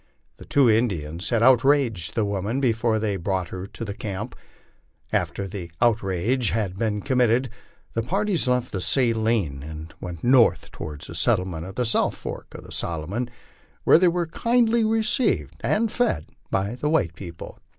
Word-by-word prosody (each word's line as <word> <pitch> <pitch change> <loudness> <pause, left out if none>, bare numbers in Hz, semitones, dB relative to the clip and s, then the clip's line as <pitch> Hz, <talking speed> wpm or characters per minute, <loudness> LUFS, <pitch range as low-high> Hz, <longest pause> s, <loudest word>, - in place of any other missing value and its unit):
The - - -12
two 140 -3 +4
Indians 95 -8 0
had 115 -2 +2
outraged 125 - +3
the 110 - +1
woman 100 +5 -1
before 115 -3 +1
they 105 -2 -1
brought 95 0 -2
her 95 +1 -6
to 115 - -6
tho 100 - -4
camp. 100 -2 -5 0.8
After 100 - -1
the 90 -3 -7
outrage 115 +1 +1
had 105 -4 -1
been 105 0 -1
committed, 125 -1 +2 0.4
the 115 - 0
parties 195 - 0
left 125 -1 +1
the 95 - -3
Saline 110 - +1
and 80 +2 -8
went 90 -3 -7
north 125 -1 +4
toward 75 -1 -7
the 85 - -7
settlement 90 -3 +1
of 95 - -9
the 125 - 0
south 115 - +2
fork - - -8
of - - -9
the - - -13
Solomon, 90 +9 -3 0.5
where - - +6
they 180 - +5
were 175 0 +1
kindly 230 +6 +2
received 220 +2 +1
and 225 0 +1
fed 85 - 0 0.2
by 100 +3 0
the 150 +4 -2
white 95 - +1
people. 85 -2 -9
110 Hz, 165 wpm, -24 LUFS, 95-130 Hz, 0.8 s, where